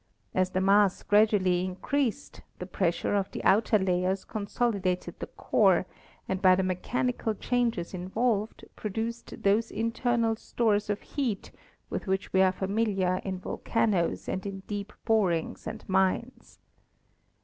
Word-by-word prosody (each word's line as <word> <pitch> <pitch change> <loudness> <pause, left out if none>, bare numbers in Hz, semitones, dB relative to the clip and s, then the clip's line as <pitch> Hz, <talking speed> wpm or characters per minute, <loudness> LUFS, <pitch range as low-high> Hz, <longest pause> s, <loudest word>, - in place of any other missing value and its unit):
As 185 0 +2
the 185 0 -1
mass 195 0 +4
gradually 205 -4 +3
increased 210 +7 -2 0.2
the 180 - -6
pressure 175 -1 -1
of 200 -1 0
the - - -6
outer 215 +2 +4
layers 185 0 0
consolidated 200 -4 -2
the - - -5
core - - +2 0.4
and 190 0 -2
by 185 -1 +6
the 190 - 0
mechanical 220 +5 -1
changes 235 -7 -1
involved 210 +4 -1
produced 225 +3 -5
those 210 +3 +3
internal 230 +1 0
stores 215 -2 0
of 205 0 -1
heat 245 -9 -3 0.4
with - - -4
which 190 +1 -1
we 190 - +5
are 190 -1 +5
familiar 195 -2 0
in 190 -1 -3
volcanoes 190 -1 -1
and 190 +1 -3
in 195 -1 -6
deep 205 +1 -5
borings 195 -8 +1
and - - -7
mines. 190 +6 0
200 Hz, 135 wpm, -28 LUFS, 185-225 Hz, 0.4 s, by